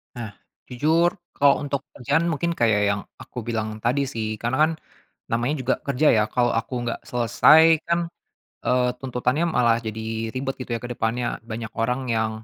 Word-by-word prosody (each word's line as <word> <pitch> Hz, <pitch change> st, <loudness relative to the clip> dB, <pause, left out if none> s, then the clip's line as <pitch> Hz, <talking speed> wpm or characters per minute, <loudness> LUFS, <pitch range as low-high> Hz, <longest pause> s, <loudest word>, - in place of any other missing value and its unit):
Nah, 115 Hz, -4 st, -6 dB, 0.4 s
jujur 160 Hz, +8 st, +2 dB, 0.2 s
kalau 140 Hz, 0 st, +3 dB
untuk 140 Hz, -1 st, -2 dB
kerjaan 145 Hz, +6 st, +1 dB
mungkin 170 Hz, +1 st, 0 dB
kayak 110 Hz, -9 st, +2 dB
yang 100 Hz, -, -2 dB, 0.2 s
aku -, -, -8 dB
bilang 110 Hz, -2 st, -3 dB
tadi 125 Hz, +5 st, +1 dB
sih, 110 Hz, -5 st, -3 dB
karena 120 Hz, +4 st, -2 dB
kan -, -, -2 dB, 0.6 s
namanya 120 Hz, +6 st, 0 dB
juga 130 Hz, 0 st, +1 dB
kerja 140 Hz, +2 st, +2 dB
ya, 105 Hz, -1 st, +3 dB
kalau 120 Hz, -1 st, +1 dB
aku 120 Hz, +1 st, -2 dB
nggak 115 Hz, -, -3 dB
selesai 125 Hz, +6 st, +5 dB, 0.2 s
kan, 170 Hz, 0 st, 0 dB, 0.6 s
eee, 125 Hz, 0 st, +2 dB
tuntutannya 130 Hz, +5 st, 0 dB
malah 120 Hz, -6 st, +3 dB
jadi 110 Hz, 0 st, -4 dB
ribet, 135 Hz, +1 st, -2 dB
gitu 125 Hz, -2 st, -3 dB
ya, 115 Hz, -, -3 dB
ke 120 Hz, -, -5 dB
depannya. 120 Hz, +1 st, -2 dB
Banyak 110 Hz, -1 st, -6 dB
orang 125 Hz, +2 st, -1 dB
yang 110 Hz, 0 st, -1 dB
125 Hz, 170 wpm, -24 LUFS, 115-140 Hz, 0.6 s, selesai